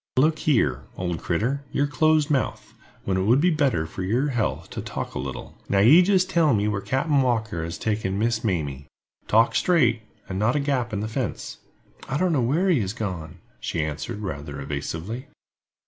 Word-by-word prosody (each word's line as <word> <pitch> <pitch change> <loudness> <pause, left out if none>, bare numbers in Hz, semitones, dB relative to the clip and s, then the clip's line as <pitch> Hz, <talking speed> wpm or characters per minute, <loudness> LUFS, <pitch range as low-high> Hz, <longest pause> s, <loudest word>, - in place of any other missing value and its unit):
"Look 155 +4 +3
here, 70 - +1
old 90 -2 -2
critter, 125 +11 -1
you're 140 - +1
close 155 +1 +2
mouthed, 140 -4 -1 0.3
when 95 -1 0
it - - +1
would 120 +6 +4
be 175 +4 +3
better 135 - +1
for 80 +4 -7
your 120 +10 +1
health 120 -6 -1
to - - -4
talk - - -5
a - - -4
little. 65 +1 -7
Now, 100 - +2
you 125 - +7
jist 185 0 +3
tell 165 -8 +3
me 105 0 +1
where 100 -1 -1
Captain 135 - +1
Walker 110 -9 0
has 85 +1 -5
taken 105 -1 -1
Miss 110 +1 0
Mamie. 75 - -2 0.4
Talk 115 +2 +4
straight, 125 -11 +3 0.3
and 95 0 -4
not 110 +5 +2
a - - +2
gap 135 -4 -1
in 105 -1 -2
the 110 - -2
fence." 115 0 -4 0.5
"I 135 - 0
don't 180 0 +1
know 140 - +2
where 150 +11 +1
he 155 -10 +3
has 95 0 -2
gone," 90 -8 -5 0.2
she 80 -2 -2
answered, 80 +9 -5
rather 70 -7 -5
evasively. 80 - -5
110 Hz, 195 wpm, -24 LUFS, 90-140 Hz, 0.5 s, you